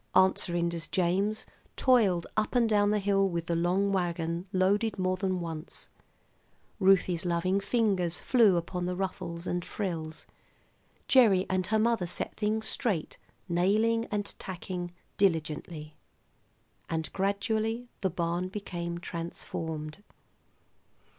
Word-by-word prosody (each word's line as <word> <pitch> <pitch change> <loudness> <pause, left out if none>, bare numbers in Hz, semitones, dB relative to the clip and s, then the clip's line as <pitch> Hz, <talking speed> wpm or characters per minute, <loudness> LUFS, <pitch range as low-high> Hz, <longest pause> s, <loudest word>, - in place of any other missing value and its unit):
Aunt 190 0 +6
Serinda's 170 -2 0
James 195 +4 0 0.3
toiled 210 -10 +3
up 215 +3 0
and 240 -2 +4
down 205 -2 +3
the 210 - +2
hill 195 -1 +2
with 170 -2 -3
the 170 - -1
long 180 +4 +2
wagon 175 -1 -1
loaded 205 +4 +2
more 185 0 +1
than 185 -1 -1
once; 165 -2 -6 0.9
Ruthie's 185 -3 +4
loving 180 +2 +1
fingers 195 -6 +1
flew 220 -8 +4
upon 175 +1 -3
the 180 - -2
ruffles 180 -2 -4
and 175 -1 -1
frills; 165 -7 -4 0.8
Gerry 215 -8 +5
and 185 -1 0
her 220 - +2
mother 225 -4 +2
set - - -3
things 220 +1 -1
straight, 195 -11 -1 0.3
nailing 215 +6 +2
and 205 -2 -2
tacking 180 -1 -5 0.3
diligently; 155 -4 -1 0.9
and 160 -1 -3
gradually 220 +4 -1
the 190 - +1
barn 175 +1 -1
became 175 -3 -5
transformed. 165 -1 -5
185 Hz, 120 wpm, -29 LUFS, 170-205 Hz, 0.9 s, Aunt